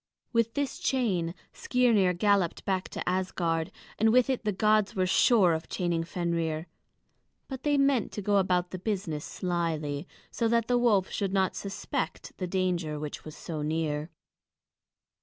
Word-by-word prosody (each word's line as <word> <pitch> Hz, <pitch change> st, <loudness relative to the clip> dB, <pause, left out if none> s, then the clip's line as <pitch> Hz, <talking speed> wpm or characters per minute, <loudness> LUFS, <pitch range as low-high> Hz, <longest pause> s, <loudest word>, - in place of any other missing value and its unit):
With 230 Hz, -1 st, +1 dB
this 285 Hz, -1 st, -2 dB
chain 190 Hz, -10 st, 0 dB, 0.2 s
Skirnir 230 Hz, -8 st, +3 dB
galloped 200 Hz, -3 st, +2 dB
back 190 Hz, -1 st, -1 dB
to -, -, -6 dB
Asgard, 175 Hz, -3 st, 0 dB, 0.3 s
and 220 Hz, +1 st, +4 dB
with 250 Hz, +2 st, +4 dB
it 255 Hz, -, -2 dB
the 210 Hz, -, +1 dB
gods 215 Hz, +1 st, +2 dB
were 185 Hz, -1 st, +2 dB
sure 185 Hz, -1 st, +4 dB
of 160 Hz, 0 st, -4 dB
chaining 170 Hz, -2 st, -1 dB
Fenrir; 165 Hz, -2 st, -2 dB, 0.8 s
but 265 Hz, -2 st, -6 dB
they 290 Hz, 0 st, +2 dB
meant 275 Hz, -5 st, +2 dB
to 210 Hz, -, -4 dB
go 205 Hz, +1 st, +3 dB
about 180 Hz, -2 st, +1 dB
the 185 Hz, -, -5 dB
business 185 Hz, -7 st, -2 dB
slyly, 165 Hz, -4 st, -2 dB, 0.2 s
so 230 Hz, -, 0 dB
that 230 Hz, 0 st, +2 dB
the 245 Hz, 0 st, +3 dB
wolf 210 Hz, -6 st, +3 dB
should 195 Hz, -2 st, -2 dB
not 190 Hz, -2 st, +1 dB
suspect 200 Hz, -1 st, -4 dB
the 185 Hz, -, -2 dB
danger 175 Hz, -4 st, -1 dB
which 150 Hz, -1 st, -6 dB
was 155 Hz, -, -10 dB
so 160 Hz, -3 st, -5 dB
near. 155 Hz, 0 st, -1 dB
185 Hz, 160 wpm, -28 LUFS, 165-220 Hz, 0.8 s, and